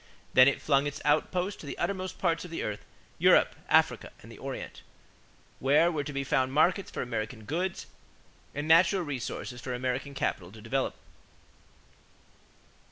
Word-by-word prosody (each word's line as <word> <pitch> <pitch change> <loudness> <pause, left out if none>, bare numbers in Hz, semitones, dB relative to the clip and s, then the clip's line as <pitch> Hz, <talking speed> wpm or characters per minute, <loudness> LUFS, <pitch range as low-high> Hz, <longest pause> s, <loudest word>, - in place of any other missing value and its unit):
Then 130 +1 +8
it 140 - +2
flung 140 -1 +3
its 145 0 -5
outposts 180 +6 +1
to 145 - -10
the - - -6
uttermost 185 -1 -3
parts 170 -3 0
of 180 - -9
the 165 - -4
earth 105 -1 -4 0.4
Europe, - - +5
Africa, - - +3
and - - -12
the - - -12
Orient - - -6 0.8
where 150 +6 +4
were 150 -3 -2
to 145 - -6
be 140 -1 -2
found 130 -1 +1
markets 175 +6 +2
for - - -4
American 110 -2 -4
goods 175 - -3 0.7
and 145 +2 -3
natural 170 +3 +5
resources 130 -3 -5
for 125 -1 -4
American 130 +3 -3
capital 90 -8 -2
to 110 - -12
develop. 130 +5 -2
140 Hz, 160 wpm, -29 LUFS, 130-170 Hz, 0.8 s, Then